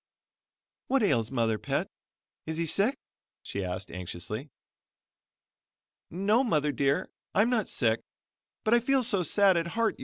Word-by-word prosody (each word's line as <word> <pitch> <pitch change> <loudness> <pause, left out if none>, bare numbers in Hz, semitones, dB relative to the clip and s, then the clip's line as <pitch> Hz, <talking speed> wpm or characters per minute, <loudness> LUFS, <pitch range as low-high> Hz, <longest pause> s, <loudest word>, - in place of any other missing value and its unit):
"What 270 -3 +2
ails 115 - +2
mother's 115 -4 0
Pet? - - -1 0.6
Is 160 0 -3
he 170 - 0
sick?" 200 - +2 0.5
she 100 - -4
asked 90 +1 -5
anxiously. 90 - -5 1.6
"No, 205 +8 +2
Mother 150 - +1
dear, 140 0 0 0.2
I'm 220 +4 +4
not 225 -5 +1
sick, 115 -3 +1 0.6
but 220 - +2
I 240 - +6
feel 265 +2 +2
so 205 -5 +2
sad 190 +2 +4
at 165 0 0
heart. 230 -1 +1
165 Hz, 140 wpm, -29 LUFS, -, 1.6 s, I